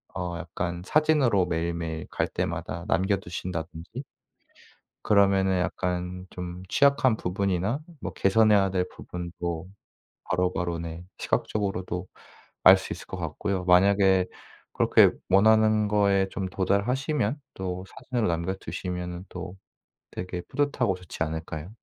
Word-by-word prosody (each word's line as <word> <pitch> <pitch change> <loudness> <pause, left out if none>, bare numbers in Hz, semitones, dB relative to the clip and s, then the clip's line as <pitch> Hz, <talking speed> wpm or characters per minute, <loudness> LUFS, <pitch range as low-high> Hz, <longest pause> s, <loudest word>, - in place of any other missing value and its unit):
어 90 -2 -3
약간 85 +1 -4
사진으로 145 - +3
매일매일 85 -1 -3
갈 - - -1
때마다 85 +1 -3
남겨 95 +3 +2
두신다든지. 90 - -6 1.0
그러면은 95 -2 +4
약간 90 +1 -2
좀 90 0 -7
취약한 140 -2 +4
부분이나 100 - -1 0.2
뭐 - - -4
개선해야 100 -1 +4
될 90 -1 0
부분도 85 -1 -5 0.6
바로바로 90 -1 0
네 85 +1 -6
시각적으로도 95 -3 -2 0.6
알 - - +10
수 - - -6
있을 - - -8
것 - - -6
같고요. 90 +4 -2
만약에 95 +1 +5 0.5
그렇게 - - +5 0.2
원하는 110 +2 +5
거에 100 -2 +3
좀 95 - -3
도달하시면 120 - 0
또 95 -1 -4
사진으로 120 -5 -2
남겨 85 +2 -1
두시면은 90 -2 -5
또 90 +1 -7 0.6
되게 90 -1 -5
뿌듯하고 130 -8 +1
좋지 90 -3 -5
않을까요? 80 +1 -5
95 Hz, 290 characters per minute, -27 LUFS, 90-100 Hz, 1.0 s, 알